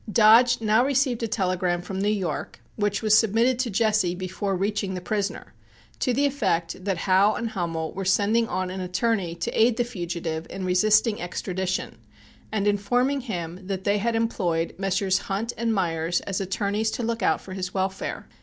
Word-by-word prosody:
Dodge 230 +3 +6
now 220 +2 +3
received 265 -3 +1
a 230 - 0
telegram 185 -4 0
from 190 +1 -5
New 205 - +2
York, 200 -5 -3 0.2
which 205 0 -1
was 215 -1 +5
submitted 230 +4 +3
to 255 -2 0
Jesse 215 -4 +1
before 185 +2 -3
reaching 200 0 -1
the - - -3
prisoner, 195 - -3 0.5
to - - +1
the 275 +4 +2
effect 185 -10 -1
that 195 -3 0
Howe 190 +4 +3
and 235 -1 -3
Hummel 165 -5 -3
were 195 - -4
sending 210 +5 +2
on 185 -3 -2
an 190 0 -5
attorney 185 -1 -1
to 170 - -3
aid 230 +1 +3
the 240 - +2
fugitive 170 -7 -4
in 190 - -5
resisting 215 +4 +3
extradition, 185 -6 -3 0.5
and 210 -2 -1
informing 245 +7 +1
him 185 -5 -6
that 190 -1 -3
they 205 0 +2
had 230 +3 0
employed 180 -8 0
Messrs. 195 0 +1
Hunt 225 +2 -3
and 230 0 -1
Meyers 175 -4 0
as 195 0 -3
attorneys 200 +3 -1
to 245 - -3
look 230 0 -2
out 160 - +2
for 185 - -10
his 185 -1 -4
welfare. 190 0 -3
200 Hz, 180 wpm, -25 LUFS, 185-225 Hz, 0.5 s, Dodge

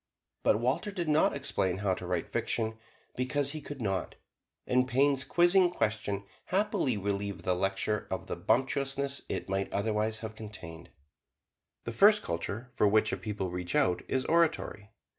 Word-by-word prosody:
But 105 - +3
Walter 125 - 0
did 180 -5 -3
not 150 -1 +3
explain 100 -10 -1
how 100 -1 +1
to 90 - -6
write 90 -2 -2
fiction, 110 -1 -1 0.4
because 135 +2 0
he 155 0 -5
could 145 -1 -8
not, 95 -5 -2 0.5
and 125 0 +2
Payn's 135 +1 +3
quizzing 175 +3 +4
question 105 - -1 0.2
happily 190 - +1
relieved 100 0 -3
the 90 - +3
lecture 95 +3 -1
of - - -3
the - - -4
bumptiousness 135 +3 0
it - - -3
might 95 0 -1
otherwise 110 +1 0
have 110 -1 -5
contained. 95 -7 -9 0.9
The 115 - -4
first 210 - +5
culture 100 +9 -4
for 105 - +3
which 110 +1 +3
a - - 0
people 95 -1 -4
reach 90 0 -4
out 90 -1 +3
is 130 -1 0
oratory. 160 -10 +1
110 Hz, 160 wpm, -30 LUFS, 100-140 Hz, 0.9 s, first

